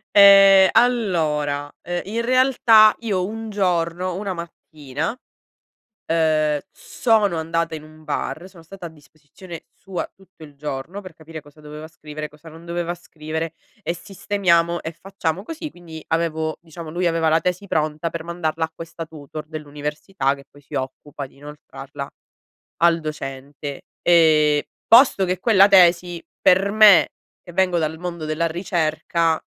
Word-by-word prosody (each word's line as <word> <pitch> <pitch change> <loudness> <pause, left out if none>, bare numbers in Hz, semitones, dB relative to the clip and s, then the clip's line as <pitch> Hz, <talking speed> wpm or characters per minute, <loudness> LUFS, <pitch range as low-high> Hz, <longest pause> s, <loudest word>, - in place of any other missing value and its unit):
Ehm, 195 -1 +8
allora, 155 -12 +1
ehm, 175 0 -3
in 225 +4 -2
realtà 235 -4 +5
io 200 -6 -1
un 225 +2 -6
giorno, 180 -2 -1
una 195 0 -3
mattina, 160 - -6 0.9
ehm, 155 -2 +1
sono 215 -7 +1
andata 165 0 -2
in 155 - -11
un 155 0 -16
bar, 155 +3 -4
sono 175 -4 -17
stata 180 +1 -10
a - - -6
disposizione 160 +3 -13
sua 190 -2 -6
tutto 190 -4 -21
il 145 -2 -13
giorno 150 +6 -6
per 185 -4 -12
capire 160 0 -10
cosa 145 +1 -19
doveva 150 +1 -9
scrivere, 155 -1 -8
cosa 150 +2 -16
non 160 +1 -13
doveva 175 0 -3
scrivere 160 -1 -6 0.3
e 170 - -1
sistemiamo, 175 -3 0
e 160 - -4
facciamo 185 0 -4
così. 315 +3 -7
Quindi 165 - -11
avevo, 160 -1 -1
diciamo, 165 -1 -10
lui 175 +2 -1
aveva 165 -1 +1
la 160 +1 +3
tesi 180 +3 -3
pronta 155 +2 -1
per 165 -1 -6
mandarla 165 -2 -2
a 160 - -5
questa 165 0 -8
tutor 155 0 -9
dell'università, 150 0 -3
che 140 -1 -14
poi 145 - -18
si 140 - -14
occupa 135 +2 -5
di - - -24
inoltrarla 140 -1 -9 0.7
al 170 -1 +4
docente, 140 -2 -7 0.2
ehm, 155 -3 +4 0.3
posto 230 -4 +6
che 185 0 -2
quella 195 -3 +6
tesi 175 -3 +4 0.2
per 195 +2 +4
me, 205 -6 +7 0.3
che 175 - -12
vengo 180 0 +1
dal 160 0 -2
mondo 170 -2 -5
della 155 +2 -1
ricerca, 165 -1 0
è - - -12
165 Hz, 150 wpm, -21 LUFS, 155-185 Hz, 0.9 s, Ehm